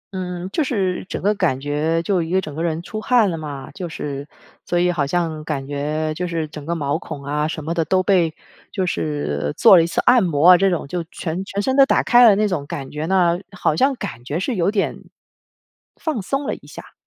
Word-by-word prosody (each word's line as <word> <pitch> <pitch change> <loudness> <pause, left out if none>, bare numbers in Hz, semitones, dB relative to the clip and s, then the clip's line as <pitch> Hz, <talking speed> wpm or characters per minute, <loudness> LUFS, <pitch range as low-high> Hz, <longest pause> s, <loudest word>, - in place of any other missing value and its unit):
嗯， 180 -1 -4
就 315 - +1
是 195 -9 -1
整 - - -5
个 205 +2 +3
感 130 -10 0
觉 150 +4 -1
就 185 0 +1
一 165 - -4
个 185 +2 +2
整 155 -6 -6
个 160 - -4
人 165 0 -2
出 215 +3 -6
汗 230 -5 +3
了 - - -3
嘛， 145 -3 -7
就 180 -3 -6
是， 140 -3 -5 0.4
所 175 - -1
以 180 0 +3
好 150 -5 -1
像 160 -1 -1
感 150 -3 -3
觉 150 +2 -2
就 180 +3 -3
是 165 -2 -2
整 150 -1 -9
个 170 - -1
毛 145 -3 -1
孔 140 - -8
啊 150 +2 -1
什 160 -2 -5
么 165 - -1
的 170 -1 +1
都 185 +4 +1
被 180 -4 +3 0.4
就 190 - -1
是 75 - -2
做 - - +8
了 175 - +7
1 165 - 0
次 - - -2
按 245 -3 +6
摩 165 -1 +4
啊， 180 - +8
这 195 +2 +3
种 175 -5 -2
就 175 +2 -3
全 180 0 -5
全 200 +1 -3
身 265 +3 0
都 275 - +7
打 - - +2
开 245 0 +6
了， 205 - +5
那 210 +1 +2
种 160 -8 -3
感 135 -2 -6
觉 150 +1 -4
呢， 175 -2 +2 0.2
好 155 - +1
像 270 - +2
感 120 - -7
觉 145 +6 -3
是 245 +8 -2
有 180 -4 +1
点， 205 -1 -1 1.0
放 310 -9 -3
松 275 +9 -2
了 - - -1
一 - - -11
下。 - - -12
170 Hz, 255 characters per minute, -21 LUFS, 150-190 Hz, 1.0 s, 做